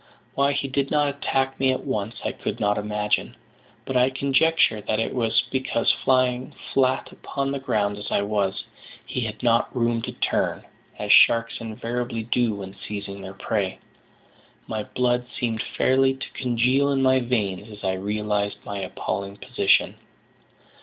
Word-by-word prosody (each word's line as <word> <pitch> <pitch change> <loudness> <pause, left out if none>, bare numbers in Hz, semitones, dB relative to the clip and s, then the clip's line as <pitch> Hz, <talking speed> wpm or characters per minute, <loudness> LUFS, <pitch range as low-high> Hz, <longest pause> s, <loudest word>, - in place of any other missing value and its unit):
Why 140 +1 +2
he 140 - -1
did 135 +1 -1
not 145 -1 +2
attack 135 -1 -1
me 130 0 +3
at 130 - -3
once 110 -4 -2
I - - +1
could - - -5
not 105 0 +2
imagine; 105 0 -1 0.5
but 135 - -4
I 125 +1 +5
conjecture 135 -3 +2
that 110 +1 -1
it 115 - -1
was 115 -3 +2
because, 130 -3 +1
lying 130 -1 +2 0.2
flat 130 -1 +2
upon 135 0 -3
the 140 - -2
ground 105 -6 0
as 105 - -6
I 100 - +1
was, 100 -2 -1 0.4
he - - -3
had 110 0 -5
not 115 +1 +2
room 115 -1 +1
to 125 +2 -4
turn, - - 0 0.3
as - - -1
sharks 115 0 +6
invariably 115 +1 -3
do 120 -1 +1
when 95 -1 -8
seizing 100 -1 -6
their 95 0 -8
prey. 100 -2 -1 0.9
My 110 -1 -3
blood 125 -1 0
seemed 115 -2 -1
fairly 135 0 +2
to 130 - -8
congeal 130 +3 +2
in 135 -1 +1
my 130 0 +5
veins 105 -5 -1
as 105 -1 -11
I 95 -1 +1
realised 105 +1 -1
my 100 -1 -4
appalling 100 +1 -4
position. - - +2
115 Hz, 160 wpm, -24 LUFS, 105-130 Hz, 0.9 s, sharks